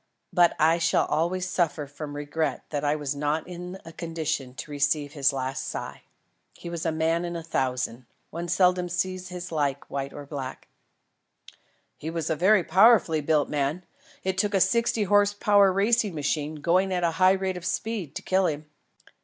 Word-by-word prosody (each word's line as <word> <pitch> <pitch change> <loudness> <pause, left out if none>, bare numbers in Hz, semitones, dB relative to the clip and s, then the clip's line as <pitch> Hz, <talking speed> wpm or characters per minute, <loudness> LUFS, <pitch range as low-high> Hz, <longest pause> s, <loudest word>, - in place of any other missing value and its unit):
But 175 -2 +4
I 160 +2 +4
shall 165 - +2
always 175 +4 0
suffer 165 -5 0
from 145 +1 -8
regret 145 +2 -2
that 145 -1 -2
I 145 +1 +2
was 145 -2 -3
not 150 +2 -1
in 180 +1 -7
a 165 - -10
condition 160 -6 -3
to 150 - -8
receive 145 0 0
his 140 -2 +2
last 130 0 -3
sigh. - - -6 0.5
He 170 - -8
was 170 -1 -3
a - - +1
man 160 +2 0
in 175 0 -4
a 165 - -5
thousand. 125 -5 -2 0.2
One 170 +2 -5
seldom 180 0 +2
sees 185 +1 -2
his 180 0 -7
like 145 -3 0
among - - -39
white 140 0 -3
or 145 - -8
black." 135 -3 -7 1.3
"He 155 - -5
was 165 -2 -2
a - - +2
very 190 +4 +4
powerfully 185 -3 +5
built 150 -1 +2
man. 150 +4 -1 0.4
It 190 0 -1
took 205 +1 +1
a - - +4
sixty 225 +3 +2
horse 205 +1 +3
power 205 -1 +4
racing 205 0 +2
machine, 150 +1 -1
going 185 +4 +2
at 180 -1 0
a 170 - +2
high 185 +1 +7
rate 190 -1 -1
of 180 - -7
speed, 185 -5 -3
to - - -5
kill 190 0 +2
him." 150 0 -3
165 Hz, 185 wpm, -26 LUFS, 145-185 Hz, 1.3 s, high